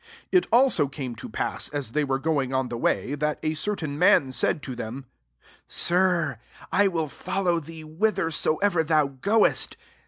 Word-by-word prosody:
^7 465 - -26 0.2
It 365 -1 +3
also 245 - +4
came 135 -3 -6
topass^ - - -4
as 140 -6 -4
they 150 +4 0
were 135 -2 0
going 135 -3 -1
on 130 -1 0
the 120 - -4
way, 135 - 0
that 150 +1 -1
a 155 - 0
certain 155 -4 -3
man 145 -6 +4
said 130 +3 0
to 135 - -6
him, 125 +1 -6
^ - - -18
f - - -28 0.6
Sir,] 170 - +2 0.3
1 200 0 +3
will 165 -3 -1
fellow 175 +6 -1
thee 160 0 -10
whi 160 +8 0
thersoever 165 +1 +1
thou 155 -2 +3
goest.' 200 - +1
155 Hz, 180 wpm, -25 LUFS, 135-180 Hz, 0.6 s, also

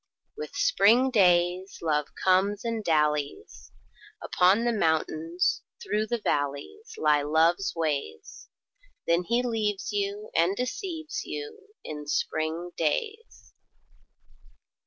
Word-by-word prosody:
With 455 +1 -7
spring 260 - +4
days 180 -2 +2
Love 150 -2 +1 0.2
comes 195 +3 +2
and 230 -2 -2
dallies: 150 - -1 0.5
Upon 190 +5 +3
the 240 - +2
mountains, 165 -1 0 0.2
through 215 +1 -1
the 240 - -1
valleys 150 - -3
Lie 150 - +3
Love's 160 +6 +2
ways. 145 - -4 0.6
Then 170 +1 +1
he 240 +4 +1
leaves 215 -5 -1
you 205 +1 -3
and 170 +4 +3
deceives 315 - -4
you 440 -1 -7 0.2
In 150 -1 -7
spring 160 +4 -2
days. 435 - -3
190 Hz, 105 wpm, -27 LUFS, 160-235 Hz, 0.6 s, spring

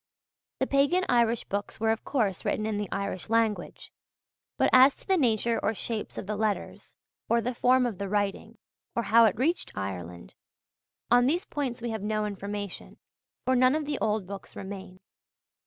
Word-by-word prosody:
The 265 - +2
pagan 285 +8 +2
Irish 235 -1 +3
books 200 +1 -4
were, 220 0 +2
of 225 - -2
course, 215 -9 -1
written 215 - -1
in 215 -1 -1
the 205 -3 -3
Irish 200 -1 -3
language; 225 -2 -1 0.6
but - - +3
as 260 +2 +7
to - - -11
the 385 - +4
nature 230 - +1
or 220 - 0
shapes 220 +1 -4
of - - -4
the 210 +2 -3
letters, 215 -1 -3 0.3
or 235 - +4
the 245 +2 -2
form 250 +1 +3
of 225 -6 -3
the 200 -1 -3
writing, 205 +2 -2 0.4
or 235 - 0
how 230 +2 +6
it 210 -3 +2
reached 320 +8 0
Ireland, 90 -7 -6 0.8
on 245 +1 +6
these 340 +6 +1
points 260 -6 -4
we 235 - -2
have 220 -2 -4
no 215 +1 -1
information, 205 -1 -6 0.5
for 260 0 +3
none 255 +2 +4
of 310 -1 -1
the 290 -1 -3
old 215 -2 0
books 195 -3 -9
remain. 190 -1 -8
220 Hz, 180 wpm, -28 LUFS, 200-250 Hz, 0.8 s, as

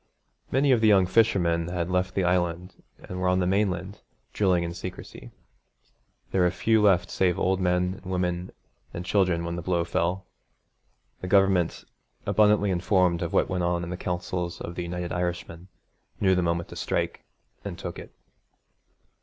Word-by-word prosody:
Many 135 +2 +2
of 120 -3 +4
the 110 - +4
young 100 -3 +5
fishermen 90 -5 +2
had 85 0 -3
left 90 0 0
the 95 - +1
Island 90 0 -1 0.2
and 90 - -8
were 90 - +1
on 90 0 +3
the 90 - +1
mainland, 95 0 -1 0.3
drilling 90 -4 +2
in 85 0 -4
secrecy. - - -8 1.0
There 95 - +2
were 90 - +4
few 110 +5 +2
left 95 -4 +3
save 90 -2 +1
old 95 0 +1
men 90 +1 0
and - - -22
women 90 0 -2 0.4
and 85 +1 -5
children 90 -4 +1
when 85 0 -3
the - - -4
blow 85 -1 0
fell. 85 +2 -1 0.9
The 90 - -6
Government, 95 -3 +2 0.4
abundantly 105 -2 +3
informed 90 -1 +2
of 85 - -2
what - - +2
went 90 -1 -2
on 85 0 0
in 85 - -5
the - - -3
councils 90 -1 -3
of 85 - -6
the 90 - -4
United 90 0 -4
Irishmen, 90 0 -4 0.5
knew 95 -2 +3
the 90 - +2
moment 85 0 -1
to - - -9
strike, - - -2 0.4
and - - -6
took - - -6
it. - - -11
90 Hz, 170 wpm, -26 LUFS, 85-95 Hz, 1.0 s, young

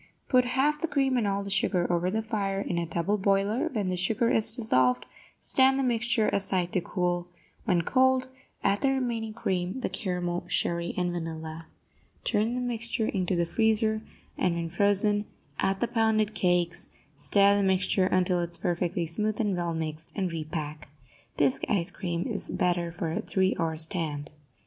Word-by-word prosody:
Put 250 -2 +4
half 275 +4 +1
the 330 - +1
cream 270 -4 +1
and 235 -4 +1
all 200 0 -1
the 200 - -5
sugar 195 -2 +1
over 175 +1 +1
the 220 +3 -1
fire 200 -3 -2
in 175 -3 -2
a 170 - -2
double 170 +6 0
boiler; 200 +4 +1
when 210 -7 -1
the 185 - 0
sugar 220 +6 +1
is 220 0 +4
dissolved, 130 - +2 0.3
stand 265 0 +4
the 270 - +1
mixture 235 -2 +1
aside 185 -3 0
to 185 - +2
cool; 175 0 -1 0.4
when 180 -6 +2
cold, 260 +3 +3 0.4
add 200 +1 +2
the 275 - +3
remaining 240 -4 -1
cream, 185 +4 -2
the - - -1
caramel, 180 -4 -3
sherry 170 0 -1
and 180 -1 0
vanilla. 160 -1 -6 0.6
Turn 220 +4 +1
the 250 - -2
mixture 230 -2 -2
into 185 -2 0
the 170 0 +1
freezer, 220 +3 +1 0.4
and, 180 -2 +2
when 170 -1 -3
frozen, 205 +3 +2 0.3
add 195 0 0
the 240 - +2
pounded 220 -2 +1
cakes; 175 -3 0 0.3
stir 200 +8 +4
the 205 - +2
mixture 190 0 +2
until 180 -1 +2
it 170 - -2
is 170 - -1
perfectly 175 0 -1
smooth 210 +6 -2
and 205 -4 +1
well 170 -1 -2
mixed, 160 0 -5
and 190 -4 -1
repack. 155 -2 -5 0.5
Bisque 140 -3 +2
ice 180 -3 +1
cream 175 -3 -3
is - - -4
better 175 -1 0
for 165 -1 -3
a - - -1
three 190 0 +1
hour 160 -1 -1
stand. 160 -3 -1
190 Hz, 180 wpm, -28 LUFS, 170-220 Hz, 0.6 s, Put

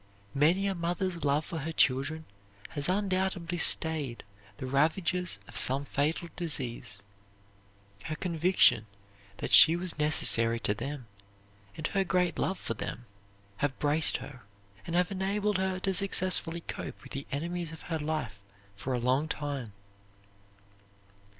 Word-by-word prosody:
Many 165 +8 +3
a 195 - 0
mother's 175 -1 -2
love 145 +1 +1
for 165 -4 -5
her 160 +3 -4
children 155 +2 +1 0.4
has 145 +2 -2
undoubtedly 185 -3 -1
stayed 155 -8 +2 0.3
the - - -6
ravages 165 +6 0
of - - -13
some 135 +2 +2
fatal 150 +5 -1
disease. 120 - -3 1.0
Her 155 - -3
conviction 165 - +3 0.5
that - - -5
she 130 +11 +9
was 175 -2 -1
necessary 115 -6 +4
to 105 - +2
them 140 +4 -6 0.7
and 155 - -4
her 195 +3 +1
great 180 -1 0
love 190 - -1
for - - -3
them 115 +2 -6 0.5
have 145 -2 -1
braced 150 +2 +4
her, 130 -4 -10 0.5
and 170 - -3
have 180 +2 +2
enabled 200 +1 -1
her 190 -1 -1
to 195 0 0
successfully 185 -3 +2
cope - - -7
with 135 - -13
the 140 +1 -6
enemies 170 +3 -3
of 160 - -11
her 160 -2 -3
life 150 -10 -4 0.3
for 115 +6 -4
a - - -1
long 130 +5 +1
time. 145 -7 -4
160 Hz, 140 wpm, -29 LUFS, 140-180 Hz, 1.0 s, she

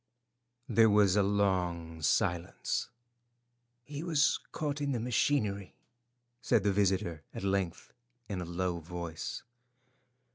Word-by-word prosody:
There 115 -1 +5
was 105 -2 +5
a 105 - +5
long 90 -5 0
silence. 85 +3 0 0.9
"He 145 +3 -6
was 160 -4 +2
caught 145 -2 -2
in 140 -1 0
the 120 - -1
machinery," 110 -5 0 0.7
said 115 -5 +2
the 100 -1 +2
visitor 95 -5 +1
at - - -5
length 95 -3 -1 0.3
in 95 -4 -3
a - - -4
low 85 0 -2
voice. 85 -1 -5
100 Hz, 115 wpm, -31 LUFS, 85-115 Hz, 0.9 s, There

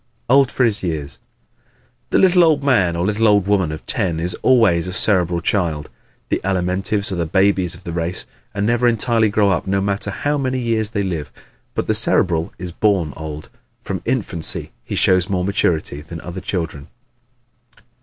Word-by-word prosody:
Old 135 -1 +5
for 130 - +1
His 115 -2 +3
Years 75 -7 -4
¶ - - -41
The - - +2
"little 180 -1 +5
old 155 -4 +3
man" 100 -12 +2
or 85 +1 -1
"little 105 +2 +2
old 100 -2 +4
woman" 95 -5 +1
of 80 - -7
ten 85 -3 -1
is 85 +2 -2
always 100 -10 +3
a 90 - -5
Cerebral 90 -4 +2
child. 80 -7 -1 0.4
The - - 0
Alimentives 95 +2 -1
are - - -2
the 85 -2 -1
babies 95 0 +1
of 90 - -15
the 85 - -5
race 85 +2 -3 0.3
and 100 0 -2
never 120 +2 +2
entirely 115 -1 +2
grow 100 -1 +2
up 90 +1 -1
no 95 +1 +1
matter 100 +1 -2
how 145 +8 -1
many 130 -1 -1
years 115 -3 -1
they 105 -3 -2
live. 85 -6 -4 0.4
But - - -1
the - - +1
Cerebral 85 -2 +2
is 90 0 -5
born 90 -6 +1
old. 80 -1 -8 0.3
From 95 -3 -4
infancy 110 -10 -3
he - - -5
shows 95 -1 +2
more 90 -2 0
maturity 80 -6 0
than 80 +2 -9
other 90 +1 -7
children. 80 -6 -4
95 Hz, 185 wpm, -19 LUFS, 85-110 Hz, 0.4 s, Old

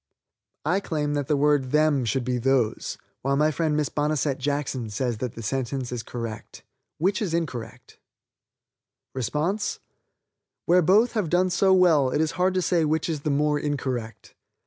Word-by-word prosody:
"I 180 +5 +2
claim 150 -6 -2
that 145 -2 -2
the 150 - +2
word 145 -2 +2
'them' 150 -3 +2
should 130 +3 0
be 125 0 -1
'those,' 125 -3 0 0.2
while 135 +1 +1
my 150 +2 +3
friend 155 -1 0
Miss 150 -2 0
Bonesette 145 -2 0
Jackson 135 -4 -2
says 120 +2 -2
that 125 -2 -4
the 115 - -7
sentence 130 +1 -2
is 120 -2 -3
correct. 115 -2 -7 0.3
Which 190 +6 0
is 175 -6 -1
incorrect?" 130 -9 -5 1.1
Where 170 - -3
both 205 +8 +4
have 210 -8 -1
done 180 +2 +2
so 190 +2 +3
well 170 -8 +5
it 135 - -1
is 155 0 +1
hard 185 +1 +1
to 185 - +1
say 170 -2 +2
which 155 0 0
is 160 -3 -2
the 150 - -2
more 150 +1 +1
incorrect. 130 -7 -4
150 Hz, 165 wpm, -25 LUFS, 130-165 Hz, 1.1 s, well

